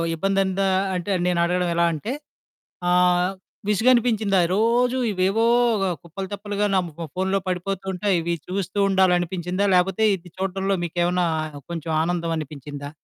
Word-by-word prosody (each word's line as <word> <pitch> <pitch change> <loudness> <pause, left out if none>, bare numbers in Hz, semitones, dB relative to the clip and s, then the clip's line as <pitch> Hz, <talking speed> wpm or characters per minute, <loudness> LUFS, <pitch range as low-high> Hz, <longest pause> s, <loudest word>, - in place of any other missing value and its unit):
ఇబ్బంది 195 +4 0
అన్ 190 -1 -2
దా 195 - +2 0.3
అంటే, 180 +3 -3
నేను 180 -1 +1
అడగడం 180 0 0
ఎలా 170 0 +3
అంటే 160 +10 -4 0.8
ఆహ్, 180 +1 +3 0.4
విసుగనిపించిందా? 220 -2 +3 0.2
రోజు 240 +4 +2
ఇవేవో 195 +4 +1 0.6
కుప్పలు, 190 +3 -6
తెప్పలుగా 205 0 -2
నా - - +5
ము 165 +1 -7
ఫోన్లో 190 +1 0
పడిపోతూ 185 +1 -3
ఉంటాయి, 195 +1 +1
ఇవి 170 +1 -1
చూస్తూ 190 +1 -3
ఉండాలి 190 -2 +4
అనిపించిందా? 180 +3 -1
లేపోతే 190 +4 +2
ఇది 180 0 -13
చూడడంలో 195 +1 -1
మీకు 170 +1 -8
ఏమన్నా 180 0 +1 0.5
కొంచెం 165 -1 -4
ఆనందం 170 -1 -1
అనిపించిందా? 145 -1 -7
185 Hz, 145 wpm, -23 LUFS, 175-200 Hz, 0.8 s, నా